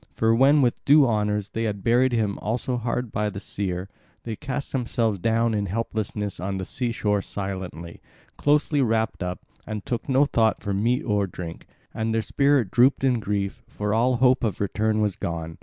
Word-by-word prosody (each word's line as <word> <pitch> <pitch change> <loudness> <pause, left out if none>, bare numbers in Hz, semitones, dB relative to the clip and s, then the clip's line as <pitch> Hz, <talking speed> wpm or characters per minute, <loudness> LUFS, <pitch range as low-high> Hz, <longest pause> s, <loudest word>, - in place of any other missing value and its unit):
For 115 0 +3
when 135 +4 +5
with 120 - 0
due 145 0 +6
honours 105 -3 0
they 115 +1 -2
had 100 -3 -3
buried 125 +2 +3
him 110 -4 0
also 120 +3 -2
hard 120 0 -2
by 105 0 0
the 100 -1 -6
seer, 95 -2 -3 0.4
they 115 -2 -4
cast 140 +3 -5
themselves 115 -5 0
down 115 +3 +1
in 105 -1 -1
helplessness 105 -1 -3
on 95 +2 -3
the 95 - -4
sea 125 +3 -2
shore 105 -3 0
silently, 95 -4 -6 0.3
closely 145 0 +2
wrapped 110 -3 0
up, 90 0 -4 0.2
and 105 -2 -5
took 120 +2 -3
no 135 +2 +4
thought 110 -6 +2
for 100 - -3
meat 120 +8 +1
or 105 -3 +1
drink; 85 -2 -8 0.3
and 110 0 -1
their 115 - +1
spirit 140 -4 +2
drooped 130 +3 +4
in 125 -3 +3
grief, 100 -2 -2
for 105 0 -3
all 125 +3 +3
hope 130 +1 +3
of 105 -5 -1
return 110 +2 0
was 105 -3 0
gone. 80 -1 -5
110 Hz, 190 wpm, -24 LUFS, 100-125 Hz, 0.4 s, due